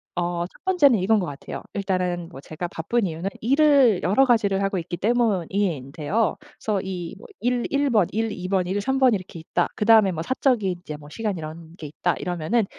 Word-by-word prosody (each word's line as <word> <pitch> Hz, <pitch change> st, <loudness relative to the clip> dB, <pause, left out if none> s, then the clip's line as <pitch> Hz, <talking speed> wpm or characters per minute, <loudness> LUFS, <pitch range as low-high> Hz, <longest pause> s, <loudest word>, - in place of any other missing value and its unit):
어 175 Hz, -1 st, -1 dB
1 180 Hz, -, -16 dB
번째는 350 Hz, -10 st, +4 dB
이거인 210 Hz, +4 st, +3 dB
것 185 Hz, -, -1 dB
같아요. 145 Hz, -3 st, -7 dB
일단은 180 Hz, -3 st, -1 dB
뭐 170 Hz, -, -11 dB
제가 155 Hz, +5 st, -6 dB
바쁜 205 Hz, +9 st, -1 dB
이유는 170 Hz, +2 st, -3 dB
일을 275 Hz, -4 st, +4 dB
여러 205 Hz, +9 st, +4 dB
가지를 205 Hz, -6 st, +2 dB
하고 195 Hz, 0 st, 0 dB
있기 175 Hz, 0 st, -4 dB
때문인데요. 195 Hz, -, 0 dB
그래서 260 Hz, -9 st, -4 dB
이 185 Hz, -1 st, -5 dB
뭐 -, -, -13 dB
'일 245 Hz, 0 st, 0 dB
1 280 Hz, 0 st, +1 dB
번, 210 Hz, -8 st, +3 dB
일 225 Hz, +1 st, 0 dB
2 180 Hz, -2 st, -5 dB
번, 185 Hz, -1 st, +1 dB
일 190 Hz, +3 st, -2 dB
3 265 Hz, +6 st, 0 dB
번 260 Hz, -3 st, +5 dB
이렇게 185 Hz, -4 st, -5 dB
있다.' 160 Hz, -, -1 dB
그다음에 215 Hz, -3 st, +5 dB
뭐 160 Hz, -1 st, -3 dB
'사적인 240 Hz, -5 st, +1 dB
이제 155 Hz, -4 st, -7 dB
뭐 150 Hz, 0 st, -12 dB
시간 215 Hz, -2 st, -3 dB
이런 160 Hz, +1 st, -9 dB
게 155 Hz, -, -7 dB
있다.' 170 Hz, +4 st, -1 dB
이러면은 180 Hz, +6 st, 0 dB
195 Hz, 355 characters per minute, -24 LUFS, 175-230 Hz, -, 번